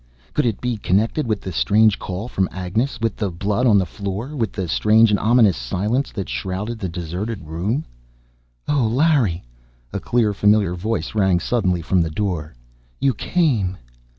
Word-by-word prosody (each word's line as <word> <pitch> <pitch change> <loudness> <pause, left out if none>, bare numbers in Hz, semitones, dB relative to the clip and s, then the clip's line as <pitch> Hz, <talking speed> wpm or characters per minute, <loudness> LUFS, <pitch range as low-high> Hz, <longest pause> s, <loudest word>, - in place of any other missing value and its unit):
Could 150 -4 +1
it 110 - -1
be 125 -2 -2
connected 110 - 0
with 110 -2 -1
the 95 - -5
strange 105 +4 +3
call 95 +5 -5
from 95 -6 -1
Agnes, 110 +9 -2
with 115 -1 -1
the 105 -3 -1
blood 100 +7 0
on 105 -3 +5
the 95 - +2
floor, 100 +10 -5
with 115 -7 -1
the 95 -4 -4
strange 110 +5 +4
and 105 - +2
ominous 110 -4 +4
silence 105 - -1
that 100 -4 -4
shrouded 105 +5 -4
the 95 - -3
deserted 90 +4 -5
room? 95 - -2 0.8
"Oh, 140 -6 +2
Larry!" 130 - +2 0.5
a - - -2
clear, 115 -4 +1
familiar 105 -2 +3
voice 110 +6 -3
rang 95 -4 +3
suddenly 90 -4 0
from 90 +3 +2
the 80 - 0
door. 80 -4 -3 0.4
"You 135 -1 +2
came!" 120 - 0
105 Hz, 170 wpm, -21 LUFS, 95-115 Hz, 0.8 s, on